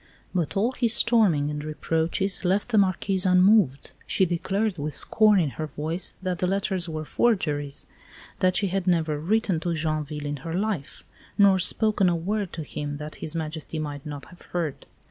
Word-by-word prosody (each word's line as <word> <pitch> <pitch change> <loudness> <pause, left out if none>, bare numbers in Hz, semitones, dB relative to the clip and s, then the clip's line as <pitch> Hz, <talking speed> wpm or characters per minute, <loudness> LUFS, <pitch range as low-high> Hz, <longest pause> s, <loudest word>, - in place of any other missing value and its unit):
But 180 +1 -1
all 225 +6 +2
his 235 -3 0
storming 190 -11 +3
and 150 0 -4
reproaches 165 +5 -1
left 190 +5 +1
the 220 -3 +4
Marquise 190 0 +2
unmoved. 185 -6 +4 0.2
She 190 - +2
declared, 190 +3 -1
with 150 +1 -3
scorn 215 -2 +4
in 155 -6 0
her 155 - -2
voice, 155 +5 -3
that 180 -2 -2
the 180 - +1
letters 190 -2 -1
were 155 -1 -4
forgeries; 150 -11 0 0.5
that 185 0 +2
she 200 - +1
had 190 0 -2
never 160 -4 +1
written 195 +1 +1
to 170 +1 -2
Joinville 155 -1 -3
in 145 0 -3
her 165 +5 -5
life, 195 -7 -3 0.3
nor 200 -2 +5
spoken 205 +1 +3
a 175 - +1
word 195 +3 -2
to 160 - -4
him 145 0 -5
that 150 +1 -7
His 155 - -4
Majesty 160 0 -4
might 145 -2 -5
not 145 -2 -7
have 175 - -16 0.2
heard. 150 -5 -3
175 Hz, 180 wpm, -25 LUFS, 155-195 Hz, 0.5 s, nor